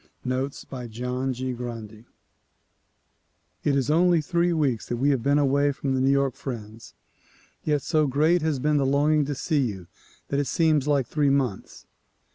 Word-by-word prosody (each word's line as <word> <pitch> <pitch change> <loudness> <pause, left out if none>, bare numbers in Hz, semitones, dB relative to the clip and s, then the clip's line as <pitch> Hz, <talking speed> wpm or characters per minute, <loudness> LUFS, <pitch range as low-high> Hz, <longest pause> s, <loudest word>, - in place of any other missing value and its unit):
Notes 130 +2 -3
by 125 -3 -7
John 125 +3 -3
G. 130 0 -3
Grundy 115 -2 -7 1.6
IT 145 - +2
IS 135 0 +1
only 175 +1 +4
three 170 +3 +1
weeks 140 -9 0
that 120 - -1
we 140 +4 +2
have 135 -4 0
been 140 +4 +2
away 140 0 +2
from 135 -1 -3
the 130 - 0
New 135 - +3
York 140 -1 +2
friends, 115 -5 -8 0.7
yet 150 -2 0
so 155 -3 +2
great 155 +6 +2
has 155 -2 0
been 150 +3 +1
the 140 - +2
longing 145 +2 +2
to 145 0 -3
see 150 +1 0
you 100 -8 -3 0.4
that 140 - 0
it 145 - -1
seems 155 -1 +2
like 140 -3 +2
three 145 +3 +1
months. 135 -8 -2
140 Hz, 175 wpm, -25 LUFS, 125-150 Hz, 1.6 s, only